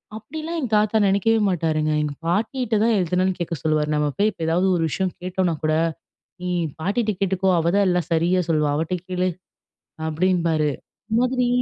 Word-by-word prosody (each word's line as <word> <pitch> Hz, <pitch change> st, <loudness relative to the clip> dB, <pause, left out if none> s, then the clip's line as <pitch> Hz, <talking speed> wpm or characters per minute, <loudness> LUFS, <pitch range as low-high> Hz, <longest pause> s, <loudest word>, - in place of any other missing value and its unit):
அப்பிடிலாம் 315 Hz, +10 st, -6 dB
எங்க 255 Hz, -, -3 dB
தாத்தா 210 Hz, +1 st, +3 dB
நினைக்கவே 210 Hz, +3 st, +2 dB
மாட்டாருங்க. 155 Hz, -3 st, 0 dB
எங்க 150 Hz, -1 st, -2 dB
பாட்டிட்ட 225 Hz, +6 st, 0 dB
தான் 230 Hz, -1 st, +3 dB
எதுனாலும் 180 Hz, +1 st, 0 dB
கேட்க 170 Hz, 0 st, -2 dB
சொல்லுவாரு. 155 Hz, -1 st, +1 dB
நம்ம 150 Hz, 0 st, +1 dB
போய் 210 Hz, +2 st, +3 dB
இப்ப 170 Hz, -5 st, -5 dB
ஏதாவது 175 Hz, +4 st, +2 dB
ஒரு 165 Hz, -, 0 dB
விஷயம் 185 Hz, +4 st, -1 dB
கேட்டோன்னா 180 Hz, -2 st, -1 dB
கூட, 155 Hz, -, +2 dB, 0.7 s
நீ 180 Hz, -, -3 dB, 0.3 s
பாட்டிட்ட 215 Hz, +5 st, 0 dB
கேட்டுக்கோ! 190 Hz, 0 st, +1 dB
அவதான் 180 Hz, +5 st, +2 dB
எல்லாம் 180 Hz, -1 st, 0 dB
சரியா 175 Hz, +3 st, +2 dB
சொல்லுவா! 150 Hz, -2 st, +2 dB
அவட்ட 165 Hz, +3 st, -1 dB
கேளு, 185 Hz, 0 st, 0 dB, 0.8 s
அப்பிடின்பாரு. 165 Hz, -2 st, +1 dB, 0.4 s
இந்தமாதிரி 250 Hz, +2 st, +2 dB
180 Hz, 155 wpm, -22 LUFS, 165-210 Hz, 0.8 s, தாத்தா